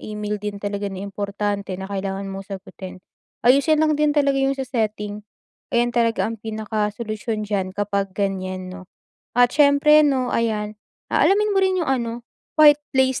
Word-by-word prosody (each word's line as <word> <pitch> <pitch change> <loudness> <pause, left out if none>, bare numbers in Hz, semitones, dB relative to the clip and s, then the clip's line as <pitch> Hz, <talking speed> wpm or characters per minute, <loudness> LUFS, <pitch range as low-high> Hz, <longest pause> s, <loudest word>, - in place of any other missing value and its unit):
e-mail 210 -1 -4
din 210 -1 -4
talaga 200 0 -3
na 195 0 -6
importante 200 -1 -3
na 190 - -6
kailangan 195 0 -4
mong 195 +1 -8
sagutin. 185 -1 -11 0.4
Ayusin 300 +5 +4
lang 310 - +2
din 300 0 +2
talaga 280 -1 +3
yung 270 0 +1
sa 270 - -3
setting. 210 -4 -3 0.6
Ayan 240 0 +2
talaga 230 -2 +1
ang 225 -1 -4
pinakasolusyon 215 +1 -3
diyan 195 -2 -3
kapag 200 -1 -1
ganyan, 185 -2 -3
'no, 185 -1 -11 0.5
at 245 0 +5
siyempre, 295 +1 +5
'no, 265 -4 +1
ayan, 215 -2 -1 0.4
ah, - - +3
alamin 420 +2 +3
mo 390 - +2
rin 375 -1 +2
yung - - -5
ano, 235 -2 -2 0.3
right 295 -1 +7 0.2
place 260 -1 +3
215 Hz, 165 wpm, -22 LUFS, 200-265 Hz, 0.6 s, right